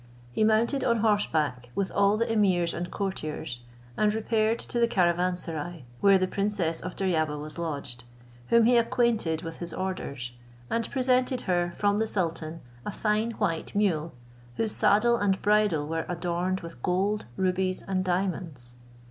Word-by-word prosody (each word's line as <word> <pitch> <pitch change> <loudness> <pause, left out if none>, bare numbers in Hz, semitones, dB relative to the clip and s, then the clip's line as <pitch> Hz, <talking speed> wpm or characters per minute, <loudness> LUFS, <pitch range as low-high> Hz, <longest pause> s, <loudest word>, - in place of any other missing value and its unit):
He 215 - +1
mounted 225 +5 +2
on 235 -3 +2
horseback 155 - +1
with 195 -1 -1
all 200 +1 +3
the 230 - +1
emirs 185 -6 +2
and 175 +1 -4
courtiers, 155 - -4 0.3
and 210 +7 +3
repaired 220 +1 +1
to 240 - -2
the 235 - +4
caravanserai, 175 - -1
where 200 -1 +6
the 185 0 +1
princess 195 -4 -1
of 180 +1 -6
Deryabar 160 -6 0
was 150 +3 -7
lodged, 140 -7 -4 0.4
whom 235 -1 +5
he 245 +1 +5
acquainted 230 -9 +1
with 165 -1 -6
his 170 -1 -6
orders; 140 -10 -4 0.4
and 230 0 0
presented 255 -1 +1
her, 175 -1 0
from 205 0 +2
the 220 - +1
sultan, 165 -4 -2 0.2
a - - -4
fine 215 +3 0
white 180 -7 -2
mule, 170 -6 +1 0.4
whose 225 -1 0
saddle 235 +5 +4
and 200 -3 +1
bridle 205 -8 +3
were 165 +1 -2
adorned 175 +2 -1
with 165 -7 -10
gold, 195 +6 0
rubies, 185 0 0
and 185 -1 -1
diamonds. 175 -9 -2
185 Hz, 155 wpm, -27 LUFS, 165-215 Hz, 0.4 s, where